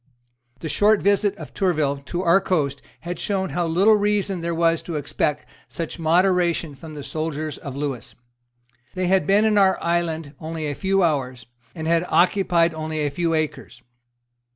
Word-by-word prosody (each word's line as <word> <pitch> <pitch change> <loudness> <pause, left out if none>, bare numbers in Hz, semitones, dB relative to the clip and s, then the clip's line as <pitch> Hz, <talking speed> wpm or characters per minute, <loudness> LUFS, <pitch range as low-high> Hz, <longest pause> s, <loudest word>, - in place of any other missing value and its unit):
The - - -4
short 210 +5 +3
visit 200 0 +2
of - - -10
Tourville 155 -8 0
to 175 +5 -3
our 180 +2 +4
coast 145 -8 -1 0.2
had 175 0 -5
shown 190 -2 -1
how 175 -1 -1
little 190 +7 +4
reason 205 -3 0
there 170 0 -2
was 165 0 +2
to 170 - -6
expect 150 0 -1 0.2
such 165 +1 -6
moderation 170 -1 +2
from 155 +3 -11
the 145 - -7
soldiers 155 0 -4
of 140 -2 -7
Lewis. 140 -4 -5 0.8
They 185 0 -1
had 190 +1 +2
been 205 +2 +4
in 210 -1 +3
our 190 -1 +4
island 165 -3 -1
only 160 -1 -5
a 145 - -2
few 195 +4 +1
hours, 130 -7 -1 0.3
and 160 -2 -5
had 170 +1 +2
occupied 175 -2 +3
only 155 -1 -3
a 145 - -1
few 165 +2 0
acres. 155 -3 -4
170 Hz, 170 wpm, -22 LUFS, 155-190 Hz, 0.8 s, our